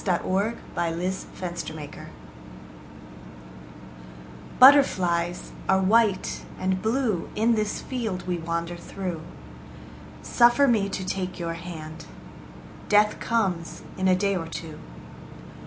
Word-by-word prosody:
Edna 195 Hz, +4 st, 0 dB, 0.5 s
St. 190 Hz, -, -9 dB
Vincent 175 Hz, -3 st, -5 dB
Millay 150 Hz, -2 st, -6 dB
Mariposa -, -, -11 dB, 2.5 s
BUTTERFLIES 180 Hz, -11 st, +5 dB, 0.2 s
are 190 Hz, -, +5 dB
white 205 Hz, 0 st, +2 dB
and 185 Hz, 0 st, -1 dB
blue 220 Hz, -5 st, 0 dB
In 225 Hz, +2 st, +3 dB
this 215 Hz, -2 st, -1 dB
field 225 Hz, -8 st, -3 dB
we 180 Hz, -1 st, -2 dB
wander 170 Hz, +1 st, -3 dB
through. 175 Hz, -1 st, -5 dB, 1.0 s
Suffer 240 Hz, +4 st, +4 dB
me 215 Hz, -5 st, +2 dB
to 190 Hz, -1 st, -4 dB
take 185 Hz, 0 st, -3 dB
your 170 Hz, -1 st, -3 dB
hand. 165 Hz, -2 st, -8 dB, 0.8 s
Death 210 Hz, 0 st, +4 dB
comes 190 Hz, -8 st, -1 dB
in 190 Hz, 0 st, 0 dB
a 185 Hz, -, +5 dB
day 200 Hz, +1 st, +1 dB
or 165 Hz, -3 st, -3 dB
two. 165 Hz, -1 st, -7 dB
190 Hz, 110 wpm, -25 LUFS, 170-215 Hz, 2.5 s, BUTTERFLIES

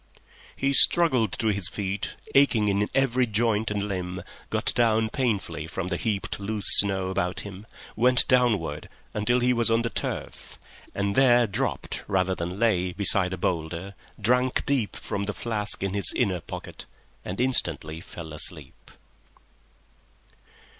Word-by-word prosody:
He 140 Hz, +1 st, 0 dB
struggled 130 Hz, -, +5 dB
to 110 Hz, -, -1 dB
his 100 Hz, -3 st, 0 dB
feet, 100 Hz, 0 st, -4 dB, 0.2 s
aching 120 Hz, -7 st, +3 dB
in 100 Hz, +1 st, 0 dB
every 130 Hz, -2 st, +2 dB
joint 110 Hz, 0 st, 0 dB
and 105 Hz, -1 st, -2 dB
limb, 90 Hz, -2 st, -5 dB, 0.3 s
got -, -, -1 dB
down 110 Hz, -2 st, +2 dB
painfully 100 Hz, -, -2 dB
from 90 Hz, +2 st, -4 dB
the 90 Hz, -, -1 dB
heaped 105 Hz, -1 st, -3 dB
loose 105 Hz, +1 st, -4 dB
snow 95 Hz, -2 st, +3 dB
about 95 Hz, -1 st, -2 dB
him, 100 Hz, +1 st, -10 dB, 0.3 s
went 125 Hz, +2 st, +4 dB
downward 110 Hz, -, +1 dB, 0.2 s
until 115 Hz, +4 st, +1 dB
he 125 Hz, +1 st, +2 dB
was 115 Hz, -1 st, +2 dB
on 115 Hz, +1 st, +2 dB
the 115 Hz, -, -3 dB
turf, -, -, -6 dB, 0.4 s
and 100 Hz, 0 st, -1 dB
there 120 Hz, -1 st, +4 dB
dropped 100 Hz, -, -4 dB
rather 95 Hz, -1 st, 0 dB
than 90 Hz, +1 st, -5 dB
lay 95 Hz, -6 st, +1 dB
beside 95 Hz, -1 st, +3 dB
a 95 Hz, -, -4 dB
boulder, 85 Hz, +2 st, -3 dB, 0.3 s
drank 125 Hz, +4 st, +1 dB
deep 130 Hz, -7 st, -1 dB
from 100 Hz, 0 st, -4 dB
the 105 Hz, -, -4 dB
flask 105 Hz, -4 st, -2 dB
in 95 Hz, -1 st, -2 dB
his 100 Hz, -1 st, +6 dB
inner 95 Hz, -8 st, 0 dB
pocket, -, -, -9 dB, 0.4 s
and 90 Hz, -, -6 dB
instantly 85 Hz, -, 0 dB
fell 80 Hz, -3 st, -10 dB
asleep 75 Hz, -, -5 dB
105 Hz, 145 wpm, -25 LUFS, 95-120 Hz, 0.4 s, his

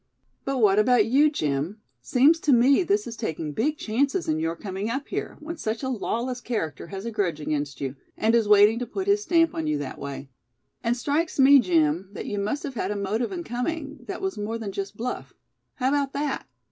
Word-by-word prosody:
"But 275 Hz, 0 st, -1 dB
what 210 Hz, -4 st, +4 dB
about 230 Hz, 0 st, +4 dB
you, 280 Hz, +7 st, +4 dB
Jim; 155 Hz, -, -2 dB, 0.2 s
seems 280 Hz, -, +4 dB
to 300 Hz, -, +1 dB
me 265 Hz, +6 st, +5 dB
this 405 Hz, +3 st, +1 dB
is 230 Hz, -, -6 dB
taking 160 Hz, -9 st, -4 dB
big 295 Hz, -, 0 dB
chances 275 Hz, -, 0 dB
in 155 Hz, 0 st, +1 dB
your 165 Hz, +1 st, -1 dB
coming 195 Hz, +3 st, -4 dB
up 270 Hz, +4 st, -3 dB
here, -, -, -4 dB
when 325 Hz, +2 st, -6 dB
such 225 Hz, -3 st, -3 dB
a 260 Hz, -, -1 dB
lawless 245 Hz, +1 st, -2 dB
character 165 Hz, -, -3 dB
has 195 Hz, +2 st, -7 dB
a 235 Hz, -, -3 dB
grudge 185 Hz, -8 st, -1 dB
against 145 Hz, -2 st, -3 dB
you, 135 Hz, -1 st, -3 dB, 0.2 s
and 220 Hz, +1 st, +2 dB
is 230 Hz, -2 st, +3 dB
waiting 210 Hz, +2 st, +6 dB
to 245 Hz, -, -3 dB
put 375 Hz, -, -4 dB
his 405 Hz, +1 st, +3 dB
stamp 335 Hz, -4 st, +3 dB
on 160 Hz, -1 st, -3 dB
you 150 Hz, -1 st, +1 dB
that 145 Hz, -2 st, -6 dB
way. 140 Hz, -1 st, -7 dB, 0.5 s
And 235 Hz, +1 st, +1 dB
strikes 300 Hz, +6 st, -1 dB
me, 275 Hz, +1 st, +8 dB
Jim, 170 Hz, -, +2 dB
that -, -, -6 dB
you 205 Hz, -, -3 dB
must 210 Hz, +9 st, -2 dB
have 275 Hz, -, -4 dB
had 200 Hz, -5 st, -2 dB
a 210 Hz, -, -2 dB
motive 205 Hz, +4 st, -1 dB
in 355 Hz, -2 st, -4 dB
coming, 290 Hz, +3 st, -4 dB
that 390 Hz, -1 st, -5 dB
was 385 Hz, -, -2 dB
more 215 Hz, +2 st, -2 dB
than 215 Hz, -3 st, -5 dB
just 195 Hz, +1 st, -5 dB
bluff. 250 Hz, +2 st, -5 dB, 0.4 s
How 255 Hz, 0 st, +1 dB
about 280 Hz, -1 st, 0 dB
that?" 285 Hz, -1 st, -2 dB
230 Hz, 220 wpm, -25 LUFS, 195-280 Hz, 0.5 s, me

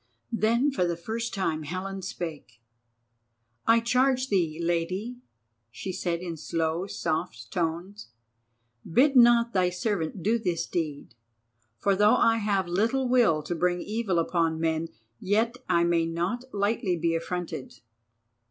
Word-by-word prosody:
Then 235 Hz, +5 st, +2 dB
for 260 Hz, -, 0 dB
the 170 Hz, -1 st, -1 dB
first 225 Hz, +6 st, -4 dB
time 165 Hz, -5 st, -1 dB
Helen 185 Hz, +5 st, -5 dB
spake: 165 Hz, -, -6 dB, 1.1 s
"I 230 Hz, +1 st, +6 dB
charge 255 Hz, +2 st, +2 dB
thee, 170 Hz, -5 st, 0 dB
Lady," 175 Hz, +8 st, -1 dB, 0.5 s
she 125 Hz, +11 st, -6 dB
said 170 Hz, -2 st, -2 dB
in 170 Hz, -3 st, -5 dB
slow 165 Hz, +3 st, -2 dB
soft 170 Hz, -1 st, -3 dB
tones, 175 Hz, +4 st, -3 dB, 0.8 s
"bid 270 Hz, -, +4 dB
not 235 Hz, -1 st, +6 dB
thy 185 Hz, -2 st, +3 dB
servant 180 Hz, -2 st, -2 dB
do 230 Hz, +3 st, +2 dB
this 180 Hz, -6 st, -1 dB
deed, 155 Hz, -4 st, -4 dB, 0.6 s
for 195 Hz, -, +2 dB
though 210 Hz, +2 st, +5 dB
I 230 Hz, 0 st, +4 dB
have 200 Hz, -4 st, 0 dB
little 230 Hz, +9 st, +1 dB
will 235 Hz, -12 st, +3 dB
to 165 Hz, -, -3 dB
bring 175 Hz, +1 st, +1 dB
evil 210 Hz, -2 st, -1 dB
upon 165 Hz, -1 st, +1 dB
men, 160 Hz, 0 st, 0 dB, 0.3 s
yet 225 Hz, +5 st, +1 dB
I 170 Hz, -, +4 dB
may 170 Hz, -1 st, +2 dB
not 175 Hz, +9 st, -2 dB
lightly 200 Hz, -3 st, 0 dB
be 165 Hz, 0 st, 0 dB
affronted." 165 Hz, -3 st, -4 dB
185 Hz, 135 wpm, -27 LUFS, 165-225 Hz, 1.1 s, I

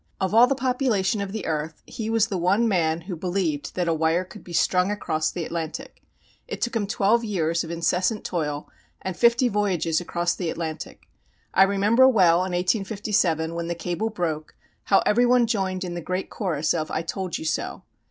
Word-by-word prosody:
Of 190 Hz, 0 st, -1 dB
all 235 Hz, +3 st, +7 dB
the 275 Hz, -, +1 dB
population 245 Hz, -6 st, 0 dB
of 200 Hz, -1 st, -4 dB
the 220 Hz, +1 st, -5 dB
earth 155 Hz, 0 st, -3 dB
he 220 Hz, -1 st, -5 dB
was 225 Hz, -1 st, +3 dB
the 200 Hz, -4 st, -3 dB
one 195 Hz, +7 st, +2 dB
man 165 Hz, -5 st, +1 dB
who 180 Hz, +2 st, -6 dB
believed 175 Hz, -4 st, -2 dB
that 180 Hz, -2 st, -1 dB
a 165 Hz, -, +2 dB
wire 160 Hz, +2 st, +1 dB
could 185 Hz, +3 st, -13 dB
be 175 Hz, -, -12 dB
strung 180 Hz, +2 st, +2 dB
across 155 Hz, -6 st, -1 dB
the 170 Hz, 0 st, -4 dB
Atlantic. 170 Hz, -, -5 dB, 0.5 s
It 485 Hz, -, -5 dB
took 240 Hz, -1 st, -2 dB
him 210 Hz, -3 st, 0 dB
twelve 215 Hz, +4 st, +2 dB
years 170 Hz, -6 st, 0 dB
of 165 Hz, -, -8 dB
incessant 180 Hz, +5 st, 0 dB
toil 150 Hz, -4 st, -3 dB, 0.4 s
and 190 Hz, -1 st, -3 dB
fifty 235 Hz, +4 st, +4 dB
voyages 185 Hz, -7 st, 0 dB
across 175 Hz, 0 st, -1 dB
the 175 Hz, -3 st, -3 dB
Atlantic. 160 Hz, -1 st, -6 dB, 0.5 s
I 190 Hz, -, +4 dB
remember 205 Hz, +6 st, +5 dB
well, 180 Hz, -9 st, +5 dB
in 185 Hz, 0 st, -1 dB
1857, 185 Hz, -3 st, 0 dB
when 170 Hz, 0 st, -3 dB
the 170 Hz, -, -2 dB
cable 175 Hz, +6 st, -2 dB
broke, 160 Hz, -7 st, -3 dB, 0.3 s
how 195 Hz, -, +4 dB
everyone 245 Hz, +2 st, +4 dB
joined 190 Hz, -4 st, -1 dB
in 180 Hz, -1 st, -4 dB
the 175 Hz, -, -4 dB
great 185 Hz, +4 st, -3 dB
chorus 160 Hz, -7 st, -1 dB
of 155 Hz, -2 st, -2 dB
"I 160 Hz, -, -2 dB
told 180 Hz, +1 st, -3 dB
you -, -, -7 dB
so." 160 Hz, -, -2 dB
185 Hz, 190 wpm, -24 LUFS, 165-210 Hz, 0.5 s, all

